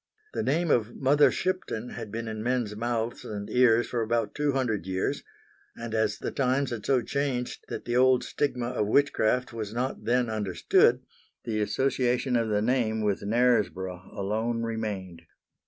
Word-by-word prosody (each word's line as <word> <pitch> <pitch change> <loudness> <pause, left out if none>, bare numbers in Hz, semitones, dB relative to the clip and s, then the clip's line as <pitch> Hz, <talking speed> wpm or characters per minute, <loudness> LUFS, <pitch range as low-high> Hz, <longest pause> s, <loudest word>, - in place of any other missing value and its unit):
The - - -1
name 160 +4 +1
of 115 0 +1
Mother 145 +2 +4
Shipton 185 -11 -2
had 105 - -7
been 115 +1 -4
in 110 -1 -4
men's 120 -3 -1
mouths 115 +1 -2
and 100 -1 -5
ears 120 -2 +4
for 120 - -2
about 115 +1 0
two 145 -1 0
hundred 110 -9 -1
years, 95 0 -1 0.6
and 115 -1 -6
as 110 -1 +1
the - - -4
times 135 0 0
had 115 -3 -4
so 130 -3 +3
changed 140 -3 -2
that - - -6
the 120 - -1
old 130 0 +5
stigma 125 -4 -1
of 110 -5 -1
witchcraft 125 -1 +2
was 110 -1 -5
not 125 -3 -3
then 125 +1 +2
understood, 105 -5 +2 0.4
the 110 -2 -1
association 125 +3 +1
of 115 -2 +1
the 105 0 +1
name 110 -2 +1
with 105 -2 0
Knaresborough 100 -5 0
alone 110 +4 -1
remained. 105 -7 -4
115 Hz, 165 wpm, -27 LUFS, 110-125 Hz, 0.6 s, old